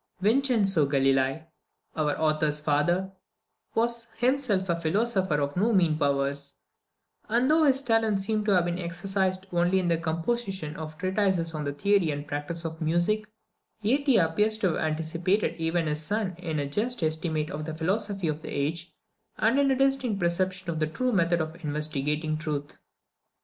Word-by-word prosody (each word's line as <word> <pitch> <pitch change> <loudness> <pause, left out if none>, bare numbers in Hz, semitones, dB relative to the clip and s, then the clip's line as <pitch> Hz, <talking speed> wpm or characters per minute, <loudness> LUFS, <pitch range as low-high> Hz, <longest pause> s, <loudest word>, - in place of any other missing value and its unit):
Vincenzo 210 - +3
Galilei, 135 +2 +1 0.5
our 150 -2 0
author's 155 -1 +1
father, 155 +6 +1 0.6
was 235 0 +1
himself 245 -7 +1
a 170 - +1
philosopher 185 0 0
of 140 0 -2
no 210 +6 +2
mean 170 -6 +3
powers; 140 -1 -1 0.7
and 245 +5 +3
though 315 0 +5
his 270 -1 +3
talents 225 -4 +2
seem 215 0 0
to 210 - -2
have 180 -3 +4
been 175 +1 -2
exercised 185 +2 -1
only 175 +2 +2
in 185 -2 +1
the 165 -1 +2
composition 170 0 -2
of 155 0 -7
treatises 185 -2 0
on 155 -1 -3
the 145 - -1
theory 195 +3 +2
and 145 0 -4
practice 150 +3 -4
of 160 +1 -5
music, 175 +7 +1 0.5
yet 270 +7 +1
he 260 -5 +5
appears 210 +6 +2
to 205 -4 +1
have 160 - -1
anticipated 165 +6 0
even 165 +1 0
his 150 0 -1
son 200 +2 -2
in 165 -4 -3
a 145 - -1
just 215 - -1
estimate 155 -1 -1
of 150 +1 -5
the 160 0 -5
philosophy 195 +2 -1
of 155 0 -2
the - - -8
age, 160 +5 -2 0.5
and 230 +5 +2
in 280 -1 +3
a 265 - +3
distinct 265 -5 +1
perception 185 +1 -1
of 160 - -3
the 155 - +1
true 250 +11 -1
method 170 -3 +2
of 160 +2 -5
investigating 150 +1 -2
truth. 150 -2 -4
170 Hz, 170 wpm, -27 LUFS, 155-210 Hz, 0.7 s, though